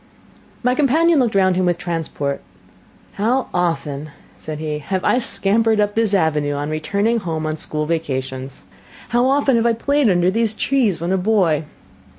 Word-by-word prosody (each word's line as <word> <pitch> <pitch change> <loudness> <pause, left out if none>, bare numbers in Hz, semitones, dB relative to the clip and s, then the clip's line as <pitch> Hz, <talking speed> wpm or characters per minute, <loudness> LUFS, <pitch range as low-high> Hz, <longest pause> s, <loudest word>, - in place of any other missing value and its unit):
My 250 +1 +2
companion 305 +4 +3
looked 235 -5 +1
round 185 -2 +3
him 185 0 +1
with 175 -1 +1
transport: 160 -5 -3 0.8
"How 250 +5 +1
often," 155 -4 -2 0.3
said 150 +11 -7
he, 155 -1 -4
"have 190 +5 -3
I 245 - +3
scampered 225 -1 +2
up 205 0 +1
this 220 -2 +2
avenue, 150 -5 +1
on 145 +2 -3
returning 200 +9 0
home 160 -5 -4
on 155 0 -2
school 150 -1 -3
vacations! 130 - -4 0.5
How 240 +2 +2
often 275 -2 +2
have 230 +1 +2
I 235 - +3
played 280 +2 +1
under 180 -1 +2
these 225 +1 +1
trees 235 -8 +1
when 170 +2 -2
a 190 - +2
boy! 180 -7 +1
185 Hz, 165 wpm, -19 LUFS, 155-230 Hz, 0.8 s, companion